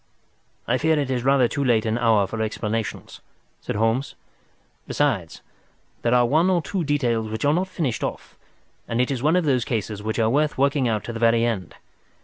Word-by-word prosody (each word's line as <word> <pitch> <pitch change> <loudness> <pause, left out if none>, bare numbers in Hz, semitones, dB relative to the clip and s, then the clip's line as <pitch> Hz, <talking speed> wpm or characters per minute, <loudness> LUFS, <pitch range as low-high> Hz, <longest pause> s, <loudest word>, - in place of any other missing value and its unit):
"I 125 +2 +1
fear 160 0 +2
it 140 -3 -1
is 125 -2 -1
rather 135 -2 +4
too 140 +3 -2
late 115 -4 +2
an 110 +1 0
hour 110 -4 +3
for 110 +3 -5
explanations," 110 0 -4 0.4
said - - -4
Holmes. 115 +5 0 0.7
"Besides, - - -1 0.6
there 120 +1 +2
are 125 0 +4
one 160 +8 +3
or 180 -2 +3
two 190 0 -2
details 120 -7 0
which 110 +4 -3
are 145 - +4
not 180 +3 0
finished 160 -10 -3
off, - - -5 0.5
and 115 - -2
it 125 +2 +1
is 130 -3 -2
one 155 +5 +3
of 180 -2 +2
those 130 -5 +2
cases 110 -3 -3
which 110 +1 -3
are 110 -2 +2
worth 150 +3 +1
working 140 -1 +2
out 110 -2 -1
to 120 - -6
the 115 - -5
very 115 0 +3
end. 100 -7 -3
120 Hz, 200 wpm, -23 LUFS, 115-145 Hz, 0.7 s, rather